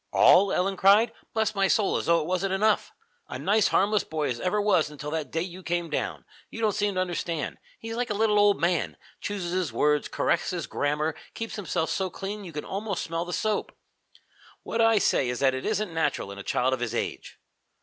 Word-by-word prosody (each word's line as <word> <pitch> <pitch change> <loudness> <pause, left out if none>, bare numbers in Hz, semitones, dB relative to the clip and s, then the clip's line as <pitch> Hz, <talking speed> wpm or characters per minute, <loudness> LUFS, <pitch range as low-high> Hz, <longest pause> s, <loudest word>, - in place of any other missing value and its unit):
"All?" 195 +2 +6
Ellen 195 +1 0
cried. 205 +5 +5 0.2
"Bless 220 0 +1
my 195 -1 +2
soul, 205 +1 +2
as - - -2
though 170 0 +4
it - - -4
wasn't 185 +2 -1
enough! 215 +2 +2 0.4
A - - -5
nice 210 +1 +3
harmless 205 +2 +2
boy 155 -2 -2
as 120 -2 -3
ever 185 +3 0
was 185 -7 +2
until 150 0 -7
that 155 -4 -3
day 165 - -1
that - - -1
you 185 +1 -10
came 175 -2 -2
down. - - -3 0.2
You - - -8
don't 220 -2 +2
seem 205 -1 0
to - - 0
understand. 175 -3 -2 0.2
He's 225 0 -6
like 245 +1 -2
a 210 - -1
little 210 0 +3
old 205 -1 +4
man. 170 0 0 0.2
Chooses 195 -4 -4
his 180 -6 -1
words, 150 +5 +2
corrects 175 - 0
my 175 - -2
grammar, 150 +1 -1 0.2
keeps 225 -1 -5
himself 170 -5 -2
so 190 -1 -1
clean 200 +3 -6
you 180 - -8
can 150 -1 -5
almost 200 0 -3
smell 165 0 -3
the 175 - -6
soap. 210 +5 -1 0.9
What 230 - -1
I 225 -1 +5
say 130 -9 +2
is 125 - -2
that 135 -1 +4
it 130 - -3
isn't 215 -4 -1
natural 160 -10 -1
in 100 - -9
a - - -7
child 130 +5 +1
of 130 - -1
his 120 -1 -3
age." - - -4
185 Hz, 220 wpm, -27 LUFS, 160-205 Hz, 0.9 s, All